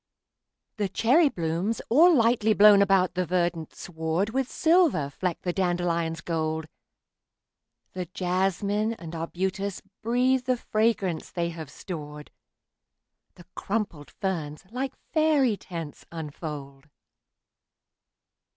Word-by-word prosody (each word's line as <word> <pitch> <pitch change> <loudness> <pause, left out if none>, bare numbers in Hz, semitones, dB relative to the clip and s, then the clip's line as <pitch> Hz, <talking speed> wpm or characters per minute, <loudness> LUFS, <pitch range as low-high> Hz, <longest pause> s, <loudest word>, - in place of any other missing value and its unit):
The 205 -2 -1
cherry 285 - +4
blooms, 170 +4 -2
all 325 +9 +6
lightly 230 -3 +3
blown 205 0 +8
about 195 -2 +3
the 185 - 0
verdant 175 -2 -1
sward, 160 +4 -2
With 265 +1 -1
silver 320 - +3
fleck 180 +3 -3
the 175 - -1
dandelion's 170 -3 0
gold; 160 -2 -2 1.3
The 180 -1 -4
jasmine 195 +5 0
and 170 -5 -9
arbutus 185 +4 -3 0.2
breathe 250 +3 +2
the 255 -1 +1
fragrance 215 -7 0
they 170 -1 -2
have 160 -4 -8
stored; 150 -3 -8 1.0
The 175 - -15
crumpled 195 - -3
ferns, 160 -4 -4
like 260 +2 -3 0.2
faery 300 -7 +3
tents, 165 -6 -8
unfold. 150 -3 -7
185 Hz, 105 wpm, -26 LUFS, 165-225 Hz, 1.3 s, blown